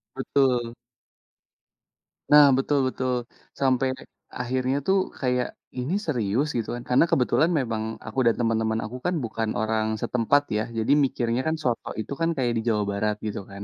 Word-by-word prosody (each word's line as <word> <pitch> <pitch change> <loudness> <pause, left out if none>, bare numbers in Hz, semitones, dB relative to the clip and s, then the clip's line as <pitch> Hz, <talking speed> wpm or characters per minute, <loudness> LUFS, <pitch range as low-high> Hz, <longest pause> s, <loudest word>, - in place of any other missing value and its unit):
Betul. 130 -3 +1 1.6
Nah, 150 -1 +9
betul 140 +1 +1
betul. 130 0 -2 0.5
Sampai 130 0 +2 0.5
akhirnya, 130 +2 -1
tuh, 195 +1 +4 0.2
kayak, 125 -1 +1 0.3
ini 135 +9 -2
serius 125 -1 0
gitu, 115 - -3
kan, 120 - -7
karena 125 +6 +5
kebetulan 150 +6 +3
memang 110 -4 -2 0.2
aku 115 +4 -3
dan 115 - +4
teman-teman 110 -1 +1
aku, 125 +4 -6
kan, 180 0 +1
bukan 110 -1 -2
orang 110 0 0
setempat, 125 +4 +2 0.2
ya, 110 - 0
jadi 110 +5 +1
mikirnya 120 -1 -1
kan 160 - +1
soto 120 -2 -1
itu, 110 - -5
kan, 165 - +2
kayak 120 -2 +1
di - - 0
Jawa 105 -2 +1
Barat 105 +1 0
gitu, 105 - -3
kan, 100 +1 -8
125 Hz, 160 wpm, -25 LUFS, 110-135 Hz, 1.6 s, Nah